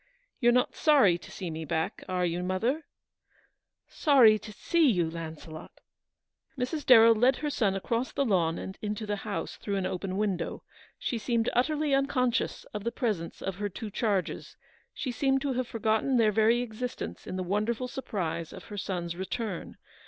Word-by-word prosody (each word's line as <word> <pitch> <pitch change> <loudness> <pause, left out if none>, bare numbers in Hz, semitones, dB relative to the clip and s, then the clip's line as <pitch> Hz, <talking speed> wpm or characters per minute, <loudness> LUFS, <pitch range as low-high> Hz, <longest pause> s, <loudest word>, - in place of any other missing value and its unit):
You're 240 -2 +5
not 250 +1 +2
sorry 230 - +5
to - - -13
see 180 -4 -5
me 160 0 -5
back, 160 +1 -2
are 180 -1 +1
you, 175 +1 -1
mother? 230 - -1 0.3
" - - -37 0.2
" - - -60 0.2
Sorry 245 -8 +7
to 215 - -10
see 325 +7 +2
you, 175 -7 +2
Launcelot! 160 -1 -8 0.4
" 320 - -45
Mrs. 270 +5 -2
Darrell 230 -2 +9
led 245 +4 +4
her 295 +2 -3
son 200 -8 +1
across 230 +6 -1
the 280 - 0
lawn 170 -7 +2
and 190 - -7
into 210 +1 -3
the 205 0 -2
house, 205 0 -4
through 200 - -3
an 195 -1 -1
open 185 +1 -3
window. 195 -5 -2 0.3
She 240 - -2
seemed 230 0 0
utterly 295 +3 +1
unconscious 270 -3 +1
of 210 -1 -4
the 235 - -1
presence 215 - -3
of 195 -1 -3
her 205 0 -2
two 210 +3 -7
charges. 200 -3 -2 0.3
She 255 - -4
seemed 270 +2 +1
to 280 -2 0
have 255 -1 -1
forgotten 225 +3 +1
their 220 -2 +4
very 225 +3 +3
existence 245 +2 -6
in - - -4
the 185 - -2
wonderful 215 +6 -1
surprise 185 - -4
of - - -10
her - - -5
son's 175 -3 -3
return. 190 +1 -4
215 Hz, 180 wpm, -29 LUFS, 185-250 Hz, 0.4 s, Darrell